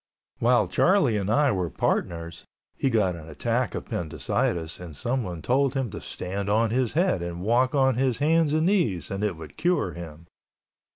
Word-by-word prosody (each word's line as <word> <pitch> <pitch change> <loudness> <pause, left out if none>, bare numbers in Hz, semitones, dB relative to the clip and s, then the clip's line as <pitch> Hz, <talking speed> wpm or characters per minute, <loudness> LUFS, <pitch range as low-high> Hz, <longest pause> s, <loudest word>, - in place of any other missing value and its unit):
While 120 -4 +3
Charlie 150 - +3
and 100 -1 -1
I 140 +4 +3
were 90 -4 -1
partners, 85 0 -2 0.3
he 135 - 0
got 105 -7 +1
an 80 -1 -10
attack 115 - -1
of - - -5
appendicitis 85 0 -2
and 85 -4 -9
someone 100 - -3
told 135 +2 +2
him 130 -5 -1
to - - -7
stand 100 +2 -4
on 110 +1 +2
his 125 -1 0
head 170 - +2
and 85 0 -5
walk 125 +6 +2
on 130 -3 +3
his 130 -2 +1
hands 160 +1 +3
and 155 +1 +2
knees 165 - +1
and 100 +1 -3
it 100 -6 -1
would 80 -1 -11
cure 175 - +1
him. 85 -1 -9
110 Hz, 180 wpm, -26 LUFS, 85-135 Hz, 0.3 s, While